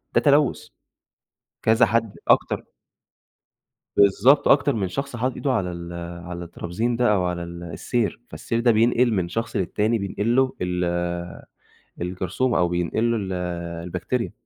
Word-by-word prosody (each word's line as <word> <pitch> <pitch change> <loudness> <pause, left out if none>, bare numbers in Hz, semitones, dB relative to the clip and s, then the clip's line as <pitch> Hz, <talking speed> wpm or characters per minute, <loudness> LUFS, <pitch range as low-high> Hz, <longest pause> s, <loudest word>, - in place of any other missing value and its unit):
ده - - +5
تلوث 145 -1 +3 1.0
كذا 110 +2 +4
حد 115 0 -1
أكتر - - +3 1.3
بالضبط 120 +9 +5
أكتر 140 0 +4
من 100 -4 -1
شخص 140 +6 -4
حاطط 125 +2 -1
إيده 140 - -1
على 90 -7 0
ال 85 0 -7 0.3
على 85 0 -6
الترابيزين 90 +8 -3
ده 120 -2 +3
أو 95 -3 +1
على 85 -1 -2
ال 85 0 -8
السير، 115 +7 -2
فالسير 115 - -3
ده 120 0 +4
بينقل 120 +2 +3
من 95 -4 0
شخص 115 +6 -3
للتاني 105 +5 +1
بينقل 105 +4 -1
له 130 -1 +3
ال 90 0 -1 1.2
الجرثومة 95 +8 -1
أو 90 - +3
بينقل 90 +7 0
له 115 - +1
ال 95 -3 -3 0.5
البكتيريا، 90 +8 -2
110 Hz, 145 wpm, -23 LUFS, 90-120 Hz, 1.3 s, ده